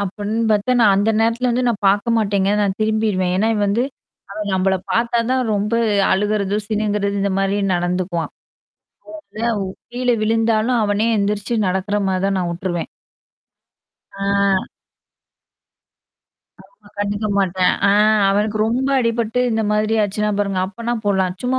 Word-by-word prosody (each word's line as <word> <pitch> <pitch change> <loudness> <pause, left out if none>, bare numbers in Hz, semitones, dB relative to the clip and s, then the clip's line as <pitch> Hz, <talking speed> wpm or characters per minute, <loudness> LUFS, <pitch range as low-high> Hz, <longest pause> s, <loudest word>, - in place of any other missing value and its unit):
அப்படின்னு 205 +3 -3
பாத்தா 210 +4 +1
நான் 205 -3 +5
அந்த 205 +3 +2
நேரத்துல 230 +2 +1
வந்து 245 +1 0
நான் 210 -4 -2
பாக்க 205 +4 +1
மாட்டேங்க 200 -3 +1
நான் 200 -2 0
திரும்பிருவேன். 215 -4 0
ஏன்னா, 215 +4 +1
இவன் 210 -1 0
வந்து 220 +5 +1 0.5
அவன் 210 0 -4
நம்மள 190 0 +1 0.2
பாத்தாதான் 235 +2 +1
ரொம்ப 210 +2 -1 0.4
அழுகுறது 205 0 0
சிணுங்குறது 205 -2 -1
இந்த 200 - 0
மாதிரி 195 +1 0 0.2
நடந்துக்குவான். 175 -1 -2 0.9
அதனால, 230 0 -3 0.4
கீழ 250 +1 -3
விழுந்தாலும் 225 +2 +1
அவனே 210 +1 +1
எந்திரிச்சு 205 +2 -1
நடக்குற 190 +3 -1
மாதிரி 190 0 -1
தான் 195 0 0
நான் 175 -1 -2
உட்டுருவேன். 175 -1 -4 1.3
ஆ. 195 - -3 2.4
ஆமா. - - -23
கண்டுக்கமாட்டேன், 200 -3 0
அ - - +4 0.4
அவனுக்கு 210 +2 0
ரொம்ப 255 +4 0
அடிபட்டு 230 0 0
இந்த 220 -1 0
மாதிரி 215 +1 +1
ஆச்சுனா 210 +1 -1
பாருங்க 200 -2 0
அப்ப 200 +4 -10
நான் 235 -2 -1
போலாம் 190 -2 +1
சும்மா 255 +1 0
205 Hz, 135 wpm, -19 LUFS, 195-225 Hz, 2.4 s, நான்